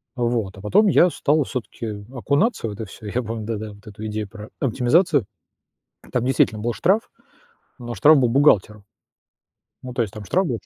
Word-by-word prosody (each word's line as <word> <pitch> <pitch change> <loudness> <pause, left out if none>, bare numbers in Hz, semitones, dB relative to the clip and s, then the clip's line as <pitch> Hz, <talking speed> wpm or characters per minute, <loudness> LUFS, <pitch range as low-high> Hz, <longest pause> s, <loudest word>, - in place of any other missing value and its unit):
Вот, 115 -6 -1
а - - -10
потом 205 - +3
я 180 -1 +5
стал 150 -2 +1
всё-таки 125 -3 -6 0.3
окунаться 140 - 0
в - - -4
это 105 +2 -6
всё, 105 +2 -13
и - - -5
я 125 - +1
помню, 110 -1 -5
да-да, 110 -1 -4
вот 105 +1 -19
эту 105 +1 -8
идею 105 -1 -3
про 105 +1 -10
оптимизацию. 135 - +2 0.9
Там 125 -2 0
действительно 120 -4 +2
был 120 +1 0
штраф, 195 - +1 0.7
но 120 -1 -6
штраф 145 +9 +6
был 125 -3 +3
бухгалтеру. 105 -6 +3 1.0
Ну, 130 - -7
то 125 - +1
есть 105 - -4
там 105 -1 -8
штраф 185 - +1
был 120 -4 -2
120 Hz, 185 wpm, -22 LUFS, 105-140 Hz, 1.0 s, штраф